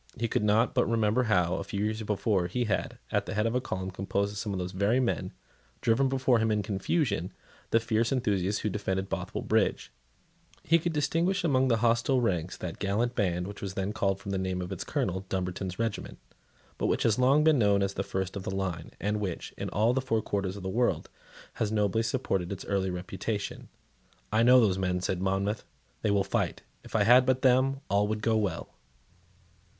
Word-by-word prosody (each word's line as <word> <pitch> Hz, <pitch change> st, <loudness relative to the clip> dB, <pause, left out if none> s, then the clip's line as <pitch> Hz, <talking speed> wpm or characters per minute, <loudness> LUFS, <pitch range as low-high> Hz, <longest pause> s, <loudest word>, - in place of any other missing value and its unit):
He 115 Hz, -, 0 dB
could 105 Hz, -, 0 dB
not 105 Hz, +3 st, +3 dB
but -, -, +2 dB
remember 115 Hz, +2 st, +2 dB
how, 90 Hz, -5 st, +2 dB
a -, -, -3 dB
few 100 Hz, +1 st, -3 dB
years 110 Hz, +1 st, -2 dB
before, 100 Hz, -3 st, 0 dB
he 120 Hz, +8 st, -1 dB
had, 110 Hz, -4 st, -2 dB
at -, -, 0 dB
the -, -, -4 dB
head 105 Hz, +1 st, +1 dB
of 115 Hz, -, 0 dB
a 125 Hz, -, +1 dB
column 95 Hz, -6 st, -4 dB
composed 100 Hz, +2 st, -1 dB
of 105 Hz, -, -5 dB
some 105 Hz, -, -3 dB
of 95 Hz, -, -2 dB
those 90 Hz, 0 st, -3 dB
very 100 Hz, +7 st, +2 dB
men, 125 Hz, -2 st, -1 dB, 0.5 s
driven 130 Hz, +4 st, +2 dB
before 130 Hz, -2 st, +2 dB
him 110 Hz, 0 st, +1 dB
in 105 Hz, -1 st, +1 dB
confusion 100 Hz, -, -1 dB, 0.4 s
the 115 Hz, -, +4 dB
fierce 115 Hz, 0 st, 0 dB
enthusiasts 105 Hz, -6 st, 0 dB
who 105 Hz, -, 0 dB
defended 95 Hz, -1 st, -2 dB
Bothwell 90 Hz, -1 st, -3 dB
Bridge 110 Hz, -1 st, +1 dB, 0.7 s
He 165 Hz, +2 st, +4 dB
could 170 Hz, +1 st, -1 dB
distinguish 165 Hz, +6 st, +1 dB
among 130 Hz, -5 st, +3 dB
the 115 Hz, -3 st, +3 dB
hostile 120 Hz, +3 st, +3 dB
ranks 90 Hz, -8 st, -1 dB
that 85 Hz, -2 st, -6 dB
gallant 105 Hz, +5 st, 0 dB
band 90 Hz, -6 st, 0 dB
which 100 Hz, +1 st, -8 dB
was 95 Hz, -1 st, -5 dB
then 95 Hz, +2 st, -2 dB
called 100 Hz, -2 st, 0 dB
from 100 Hz, 0 st, -6 dB
the 95 Hz, -, -1 dB
name 95 Hz, -1 st, -2 dB
of 90 Hz, -1 st, -5 dB
its -, -, -4 dB
Colonel, 95 Hz, -, -1 dB
Dumbarton's 95 Hz, 0 st, -3 dB
regiment, 115 Hz, -2 st, -3 dB, 0.6 s
but -, -, +1 dB
which -, -, +1 dB
has 110 Hz, +1 st, +2 dB
long 135 Hz, +4 st, +5 dB
been 155 Hz, -3 st, +4 dB
known 100 Hz, -2 st, +3 dB
as 100 Hz, 0 st, -1 dB
the 100 Hz, -, -2 dB
first 95 Hz, -1 st, -3 dB
of 100 Hz, -, -4 dB
the -, -, -5 dB
line, 95 Hz, -4 st, -3 dB
and 105 Hz, +1 st, -1 dB
which, 95 Hz, -5 st, -4 dB
in -, -, -4 dB
all 110 Hz, +4 st, +2 dB
the 130 Hz, -, +1 dB
four 115 Hz, -4 st, 0 dB
quarters 100 Hz, -1 st, -2 dB
of 100 Hz, -, -8 dB
the -, -, -3 dB
world, 120 Hz, +6 st, 0 dB, 0.5 s
has 110 Hz, -2 st, +1 dB
nobly 105 Hz, 0 st, +1 dB
supported 110 Hz, -7 st, -1 dB
its 95 Hz, -, -6 dB
early 95 Hz, -1 st, 0 dB
reputation. 95 Hz, +3 st, -4 dB, 0.6 s
"I 110 Hz, +1 st, +3 dB
know 125 Hz, +2 st, +7 dB
those 100 Hz, -5 st, +2 dB
men," 90 Hz, -1 st, 0 dB
said 90 Hz, 0 st, -2 dB
Monmouth; 100 Hz, +3 st, 0 dB, 0.4 s
"they 110 Hz, -, +1 dB
will 100 Hz, -1 st, +3 dB
fight. 95 Hz, -, -2 dB, 0.2 s
If -, -, -10 dB
I 105 Hz, -, +4 dB
had 125 Hz, +4 st, +7 dB
but 130 Hz, +1 st, +1 dB
them, 135 Hz, +1 st, +3 dB
all 100 Hz, +1 st, +2 dB
would 110 Hz, 0 st, -3 dB
go 115 Hz, -1 st, +2 dB
well." 105 Hz, -3 st, -2 dB
105 Hz, 210 wpm, -29 LUFS, 95-115 Hz, 0.7 s, know